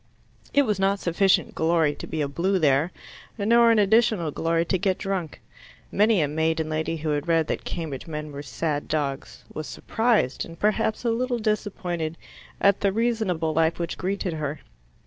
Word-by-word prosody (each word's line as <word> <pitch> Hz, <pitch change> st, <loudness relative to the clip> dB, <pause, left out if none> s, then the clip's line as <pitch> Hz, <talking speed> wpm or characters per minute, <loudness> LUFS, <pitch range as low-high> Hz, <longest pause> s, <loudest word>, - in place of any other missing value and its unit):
It 285 Hz, -, +4 dB
was 210 Hz, -6 st, -1 dB
not 195 Hz, +1 st, +2 dB
sufficient 185 Hz, +2 st, +2 dB
glory 160 Hz, -2 st, +2 dB
to -, -, -8 dB
be 155 Hz, -, -3 dB
a 145 Hz, -, 0 dB
Blue 180 Hz, +7 st, 0 dB
there, 150 Hz, +1 st, +2 dB, 0.5 s
nor 235 Hz, +3 st, +5 dB
an 230 Hz, -, +4 dB
additional 210 Hz, -5 st, +3 dB
glory 165 Hz, +2 st, 0 dB
to 185 Hz, +2 st, 0 dB
get 190 Hz, 0 st, +1 dB
drunk. 190 Hz, -6 st, -3 dB, 0.5 s
Many 210 Hz, -2 st, +3 dB
a -, -, +1 dB
maiden 160 Hz, +1 st, 0 dB
lady 155 Hz, +1 st, -2 dB
who 155 Hz, 0 st, -3 dB
had 150 Hz, +1 st, -1 dB
read 165 Hz, -1 st, +3 dB
that -, -, -3 dB
Cambridge 160 Hz, -5 st, -5 dB
men 150 Hz, -1 st, -5 dB
were 140 Hz, 0 st, -6 dB
sad 145 Hz, +2 st, -3 dB
dogs, 140 Hz, -3 st, -3 dB
was 155 Hz, -, -5 dB
surprised 225 Hz, -, 0 dB
and 165 Hz, 0 st, -11 dB
perhaps 220 Hz, +2 st, 0 dB
a 235 Hz, -, +3 dB
little 245 Hz, +1 st, 0 dB
disappointed 185 Hz, -7 st, -2 dB, 0.4 s
at 200 Hz, -1 st, +4 dB
the 200 Hz, -, +2 dB
reasonable 210 Hz, -8 st, 0 dB
life 160 Hz, +1 st, +2 dB
which 170 Hz, -1 st, -3 dB
greeted 190 Hz, -1 st, -2 dB
her. 150 Hz, -1 st, -4 dB
170 Hz, 175 wpm, -25 LUFS, 155-205 Hz, 0.5 s, nor